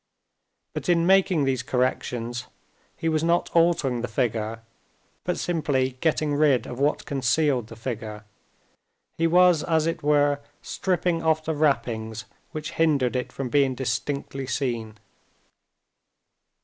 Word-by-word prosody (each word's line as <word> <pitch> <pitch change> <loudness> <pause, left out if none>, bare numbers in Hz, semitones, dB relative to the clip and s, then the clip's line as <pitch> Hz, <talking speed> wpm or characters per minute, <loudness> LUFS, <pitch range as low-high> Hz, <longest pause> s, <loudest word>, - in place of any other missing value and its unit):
But - - -4
in 170 -1 +3
making 190 -4 +4
these 130 -2 0
corrections 125 -2 -2 0.5
he 165 - -2
was 155 -1 +1
not 170 +1 +1
altering 165 -8 +3
the 120 - -2
figure 115 -2 -2 0.6
but - - -1
simply 145 -6 0
getting 155 -2 +1
rid 145 -5 +3
of 125 -1 -7
what 145 +2 +1
concealed 135 -3 +1
the 115 - -10
figure. 110 -2 -6 0.9
He 165 - +3
was, 180 -1 +5
as 160 -2 +1
it 165 - -2
were, 145 -1 +3 0.2
stripping 180 -2 -1
off 160 -1 +1
the 160 - 0
wrappings 115 -7 -1 0.3
which 155 0 -5
hindered 145 -6 +2
it 125 - -2
from 135 -2 -4
being 135 -1 +2
distinctly 135 +2 -3
seen. 115 -5 -2
140 Hz, 130 wpm, -25 LUFS, 120-160 Hz, 0.9 s, was